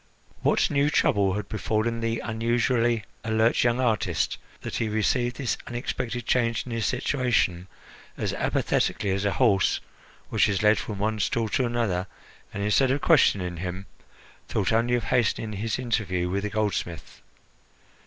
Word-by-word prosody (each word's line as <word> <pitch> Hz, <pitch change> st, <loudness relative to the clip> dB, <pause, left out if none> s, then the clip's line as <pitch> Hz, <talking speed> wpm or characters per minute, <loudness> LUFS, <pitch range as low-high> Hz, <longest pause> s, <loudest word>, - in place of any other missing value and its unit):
What -, -, +2 dB
new 140 Hz, +1 st, +2 dB
trouble 100 Hz, -9 st, +2 dB
had 105 Hz, -1 st, -4 dB
befallen 110 Hz, +1 st, -1 dB
the 115 Hz, 0 st, -2 dB, 0.2 s
usually 120 Hz, -1 st, +1 dB, 0.2 s
alert 110 Hz, +1 st, +2 dB
young 120 Hz, +1 st, +2 dB
artist 115 Hz, -6 st, 0 dB, 0.2 s
that -, -, -4 dB
he 110 Hz, -, -1 dB
received 120 Hz, +3 st, 0 dB
this 125 Hz, -2 st, -2 dB
unexpected 120 Hz, 0 st, -4 dB
change 115 Hz, -2 st, +1 dB
in 125 Hz, -, -8 dB
his 115 Hz, -3 st, -1 dB
situation 120 Hz, -8 st, 0 dB, 0.5 s
as -, -, -2 dB
apathetically 100 Hz, -, 0 dB
as 95 Hz, +1 st, -1 dB
a 100 Hz, -, +1 dB
horse 100 Hz, -3 st, +3 dB, 0.5 s
which -, -, +3 dB
is 100 Hz, -1 st, 0 dB
led 105 Hz, +1 st, +5 dB
from 105 Hz, -, -5 dB
one 110 Hz, +2 st, -1 dB
stall 115 Hz, +2 st, 0 dB
to 125 Hz, +3 st, +1 dB
another, 105 Hz, -6 st, -1 dB, 0.4 s
and, 100 Hz, -, -4 dB
instead 115 Hz, +6 st, +3 dB
of 140 Hz, +2 st, 0 dB
questioning 95 Hz, -, +3 dB
him, 90 Hz, +2 st, -5 dB, 0.6 s
thought 105 Hz, 0 st, 0 dB
only 120 Hz, +2 st, +2 dB
of 120 Hz, -, -1 dB
hastening 110 Hz, -3 st, 0 dB
his 105 Hz, +2 st, -2 dB
interview 100 Hz, -8 st, -1 dB
with 100 Hz, +1 st, 0 dB
the -, -, -1 dB
goldsmith? 100 Hz, -6 st, -3 dB
110 Hz, 155 wpm, -26 LUFS, 100-120 Hz, 0.6 s, led